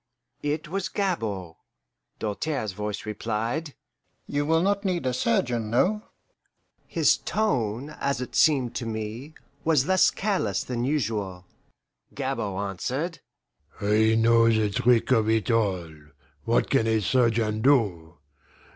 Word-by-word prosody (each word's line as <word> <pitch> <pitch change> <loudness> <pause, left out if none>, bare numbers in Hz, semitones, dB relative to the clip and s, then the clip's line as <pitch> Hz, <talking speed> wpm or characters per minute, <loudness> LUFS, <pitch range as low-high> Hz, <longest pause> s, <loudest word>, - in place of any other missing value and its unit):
It 150 +1 -2
was 190 +4 -3
Gabord. 110 - -2 0.6
Doltaire's 110 +2 -2
voice 105 +3 -5
replied, 115 +8 -3 0.5
"You 145 0 -2
will 165 +1 +3
not 200 +1 +1
need 180 -7 -1
a 130 - 0
surgeon 120 -2 0
no?" 195 - +2 0.9
His - - +3
tone, 135 - -1
as 140 -4 -2
it 125 - -6
seemed 135 -6 +3
to 115 - -4
me, 110 +7 -5 0.3
was 155 -5 +3
less 185 +1 +4
careless 185 - -1
than 120 -1 -3
usual. 105 -10 -2 0.7
Gabord 100 0 -2
answered, 140 - -3 0.6
"I 110 +2 +3
know 115 0 +5
the 110 -2 +2
trick 120 +4 +2
of 110 -3 +3
it 110 +1 +1
all 95 -8 0 0.5
what - - +1
can 115 - +3
a 110 -1 +2
surgeon 115 -1 +1
do? 100 - +2
115 Hz, 125 wpm, -26 LUFS, 105-145 Hz, 0.9 s, know